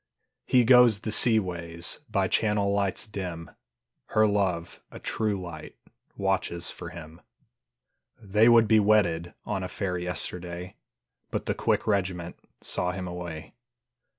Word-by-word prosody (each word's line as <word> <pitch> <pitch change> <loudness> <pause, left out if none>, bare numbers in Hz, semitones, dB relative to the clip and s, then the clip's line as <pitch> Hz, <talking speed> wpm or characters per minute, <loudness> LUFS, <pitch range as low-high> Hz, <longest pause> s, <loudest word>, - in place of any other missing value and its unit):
He 125 -1 +5
goes 120 -3 +6
the 110 - -3
sea 115 +1 +6
ways 85 -4 -3
By 100 -3 +1
channel 105 -1 +1
lights 100 +1 0
dim, 90 -5 -6 0.6
Her 110 0 +3
love, 95 -5 -1
a - - -11
true 105 -3 -2
light, 85 -4 -9 0.4
Watches 95 -4 -1
for - - -8
him. 80 0 -11 1.0
They 105 +2 +3
would 115 -2 +6
be 110 0 +5
wedded 85 -5 +2
On 100 -2 -2
a 90 - -3
fair 90 -2 -3
yesterday, 90 0 -4 0.5
But - - -3
the - - 0
quick - - 0
regiment 90 -4 -1 0.3
Saw 90 0 -1
him 90 0 -5
away. 85 -3 -7
95 Hz, 135 wpm, -27 LUFS, 85-105 Hz, 1.0 s, goes